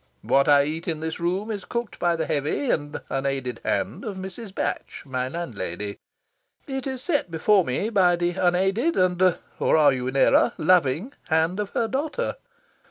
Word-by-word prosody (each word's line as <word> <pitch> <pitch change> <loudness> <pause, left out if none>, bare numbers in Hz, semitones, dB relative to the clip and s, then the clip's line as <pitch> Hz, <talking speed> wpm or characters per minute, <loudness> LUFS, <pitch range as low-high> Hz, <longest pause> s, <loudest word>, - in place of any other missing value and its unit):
What 140 +1 +3
I 145 -1 +6
eat 160 +3 -4
in 160 -3 -1
this 160 +1 -4
room 185 +6 -1
is 205 -3 -4
cooked 235 -2 -4
by 175 -1 +2
the 165 - -1
heavy 150 - 0
and 145 0 -2
unaided 135 -3 -2
hand - - -1
of 205 -4 -5
Mrs. 190 +3 -7
Batch, - - -3
my 130 -2 -2
landlady. 105 - -5 0.7
It 270 -1 -4
is 260 -1 -4
set 290 - 0
before 185 +4 +3
me 170 - -2
by 180 -4 +4
the 175 0 0
unaided 195 - +1
and 185 -1 +3 0.2
or - - +3
are 145 -3 +6
you 125 -1 -3
in 130 - -3
error? 135 - +4
loving 175 - +2
hand 160 +3 +1
of 205 -1 -2
her 230 - +1
daughter. 300 - -2
175 Hz, 175 wpm, -24 LUFS, 145-210 Hz, 0.7 s, I